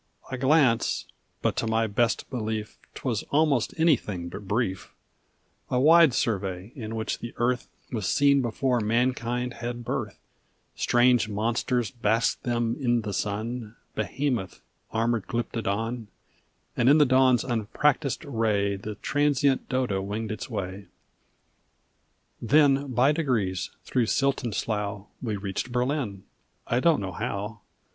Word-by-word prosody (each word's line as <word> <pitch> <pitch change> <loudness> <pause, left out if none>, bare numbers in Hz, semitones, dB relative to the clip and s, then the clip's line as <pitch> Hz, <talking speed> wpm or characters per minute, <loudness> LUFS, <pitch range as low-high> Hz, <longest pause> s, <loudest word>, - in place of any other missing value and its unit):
A 130 - -2
glance, 135 -4 +3 0.4
but - - +1
to 115 - 0
my 110 0 +2
best 115 +2 0
belief 110 -3 -3 0.2
'Twas 120 -6 -2
almost 145 -5 +2
anything 105 - +1
but 100 +3 -9
brief 100 -3 -1 0.8
A 125 - +1
wide 160 -1 +6
survey, 95 -2 -1
in 115 -4 -5
which 110 -1 -2
the 120 - -7
earth 125 +1 0 0.2
Was 110 -6 -2
seen 140 -1 +4
before 125 +1 0
mankind 120 +2 0
had 120 +1 -5
birth; - - -3 0.6
Strange 120 -2 +3
monsters 115 +3 0
basked 115 -2 +1
them 120 -1 0
in 120 -3 +2
the 105 -2 -4
sun, 110 +3 -3 0.2
Behemoth, 125 - -2 0.3
armored 115 -1 0
glyptodon, 115 0 -2 0.7
And 120 - +3
in 145 - +7
the 150 - +6
dawn's 130 -1 +4
unpractised 130 +5 0
ray 105 -6 0
The 105 +2 -6
transient 145 +2 +1
dodo 125 -7 0
winged 105 +3 -4
its 110 - -5
way; 95 +1 -5 1.5
Then, 140 +1 +3
by 125 +4 +4
degrees, 115 - 0
through 120 -3 0
silt 135 +3 +1
and 115 -4 -3
slough, 105 -2 -2 0.2
We 110 -4 -2
reached 100 +5 -4
Berlin 125 -6 -1 0.4
I 120 - +1
don't 160 -1 +3
know 95 -1 -4
how. 100 +4 -4
120 Hz, 130 wpm, -26 LUFS, 105-130 Hz, 1.5 s, in